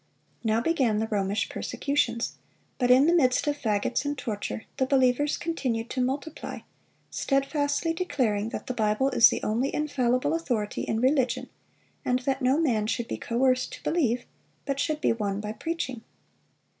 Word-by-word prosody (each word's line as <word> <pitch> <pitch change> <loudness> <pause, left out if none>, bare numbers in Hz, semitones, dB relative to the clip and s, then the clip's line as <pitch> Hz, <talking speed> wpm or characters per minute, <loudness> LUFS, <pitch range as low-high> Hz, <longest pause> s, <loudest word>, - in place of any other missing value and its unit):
Now 220 0 +2
began 260 -7 +2
the 220 - 0
Romish 205 -2 -1
persecutions; 250 -5 -1 0.5
but 245 -2 +2
in 255 +3 +7
the 335 - +4
midst 255 -7 +3
of 295 -1 +1
fagots 215 -5 0
and 290 0 -2
torture 220 -3 -4
the 260 -2 +1
believers 265 +1 +2
continued 245 -9 -2
to 255 - -1
multiply, 280 +5 -3 0.5
steadfastly 285 +3 0
declaring 240 - 0
that - - -6
the 255 - -3
Bible 220 +3 +1
is 230 - +7
the - - -3
only 235 +6 0
infallible 255 -4 0
authority 245 -11 -1
in 220 +1 -1
religion, 260 -1 +1 0.5
and 250 - +2
that 270 0 0
"no 260 +2 +3
man 230 -10 +1
should 235 0 -1
be - - -3
coerced 255 +2 +1
to - - -10
believe, 250 -8 +1 0.4
but 275 -1 -2
should 305 0 -1
be - - +3
won 205 -3 -2
by 210 0 -4
preaching." 260 -2 -4
255 Hz, 160 wpm, -27 LUFS, 225-285 Hz, 0.5 s, in